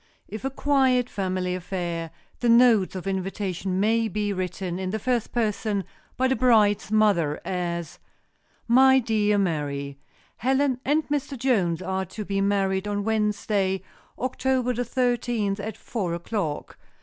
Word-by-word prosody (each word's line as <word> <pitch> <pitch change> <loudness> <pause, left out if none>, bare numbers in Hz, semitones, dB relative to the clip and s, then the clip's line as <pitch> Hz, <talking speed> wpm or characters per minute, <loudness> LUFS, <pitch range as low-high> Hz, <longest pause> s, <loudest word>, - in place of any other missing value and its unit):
If 215 - -7
a 270 - 0
quiet 265 -3 +2
family 185 -2 -2
affair, 175 -2 -3 0.3
the 240 - +1
notes 230 -5 +5
of 185 - -5
invitation 190 -1 -2
may 225 +2 +2
be 210 -1 -1
written 180 -1 -3
in 190 -1 -2
the 215 - -1
first 240 +1 -1
person 215 -3 -1 0.3
by 260 - +3
the 265 - +2
bride's 215 -4 +3
mother, 200 -9 +3
as: 170 -2 -3 0.7
"My 265 +2 +6
Dear 215 -4 +2
Mary: 140 -6 -2 0.4
"Helen 265 0 +1
and 300 +3 +1
Mr. 285 -1 -2
Jones 190 -9 +1
are 190 +1 -2
to 210 +4 -7
be 195 0 -1
married 195 -1 +1
on 205 0 -1
Wednesday, 210 -3 0 0.3
October 255 0 0
the 245 +1 -2
thirteenth, 240 -5 0
at 215 +1 -5
four 185 -8 -3
o'clock. 170 -3 -4
205 Hz, 140 wpm, -25 LUFS, 185-240 Hz, 0.7 s, My